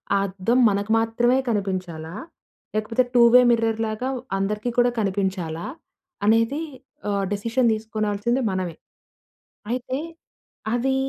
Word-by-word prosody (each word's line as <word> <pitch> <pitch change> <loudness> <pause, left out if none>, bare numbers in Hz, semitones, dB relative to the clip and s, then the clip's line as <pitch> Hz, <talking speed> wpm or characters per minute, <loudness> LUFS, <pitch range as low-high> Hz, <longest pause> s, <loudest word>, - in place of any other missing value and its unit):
ఆ - - +4
అద్దం 195 +6 0
మనకు 200 +2 -1
మాత్రమే 240 +3 +2
కనిపించాలా? 185 -5 -3 0.6
లేకపోతే 225 +4 +1
టూవే 240 0 +7
మిర్రర్ 225 -1 +1
లాగా 215 +4 -3 0.3
అందరికీ 210 +4 -1
కూడా 245 0 +5
కనిపించాలా? 190 -5 -2 0.6
అనేది 230 +6 +3 0.5
ఆహ్, 200 -1 0
డెసిషన్ 230 +4 +1
తీసుకోనాల్సింది 215 +2 -1
మనమే. 185 -3 -3 1.0
అయితే 255 +1 -2 0.8
అవి 265 +2 +1
215 Hz, 105 wpm, -23 LUFS, 195-240 Hz, 1.0 s, టూవే